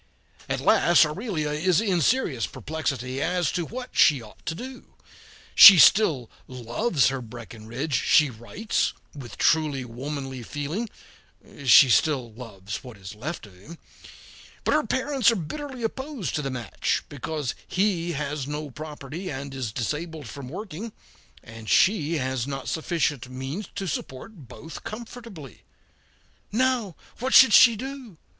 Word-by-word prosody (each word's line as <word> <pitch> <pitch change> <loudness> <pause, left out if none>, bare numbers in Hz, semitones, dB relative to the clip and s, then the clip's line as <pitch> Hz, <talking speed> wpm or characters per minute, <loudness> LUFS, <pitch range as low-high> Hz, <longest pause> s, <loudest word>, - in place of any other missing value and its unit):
At - - -1
last 170 -1 +5
Aurelia 155 -2 -3
is 165 +3 +2
in 190 -6 +1
serious 145 - +1
perplexity 135 - -4
as 175 -3 0
to 175 -3 -3
what 255 +1 -7
she 145 -3 +5
ought 110 -3 -15
to 165 - -2
do. 255 +7 -10 0.6
She 200 -2 +11
still 160 - +5 0.2
loves 130 - 0
her 135 -1 -4
Breckinridge, 120 +4 -7
she 150 -4 +4
writes, 120 - -2 0.2
with 135 -5 -10
truly 150 -5 +1
womanly 135 +2 -6
feeling 150 - -4 0.8
she 130 +2 +8
still 125 -3 +1
loves 105 -4 -8
what 125 -5 -11
is 95 +1 -9
left 130 +5 -6
of 100 - -16
him 140 - -13 0.9
but - - +1
her 305 -1 +1
parents 260 -3 +2
are 230 - +2
bitterly 255 - -6
opposed 265 - -4
to 150 - -1
the 135 - -3
match, 125 -3 -2
because 145 -1 -4
he 180 -3 0
has 145 -2 -4
no 150 0 -5
property 155 +4 -7
and 135 -1 -6
is 130 -5 -4
disabled 150 +5 -4
from 135 +1 -9
working, 205 - -7 0.5
and 115 -1 -10
she 170 -5 +3
has 130 -2 -2
not 135 -1 -5
sufficient 155 -6 -2
means 135 +10 -6
to 195 - -4
support 145 - -7
both 155 +7 -10
comfortably. 225 - -9 0.9
"Now, 235 -5 0 0.2
what 260 +3 0
should 235 -5 +8
she 235 0 +8
do?" 255 - -8
150 Hz, 140 wpm, -25 LUFS, 130-200 Hz, 0.9 s, She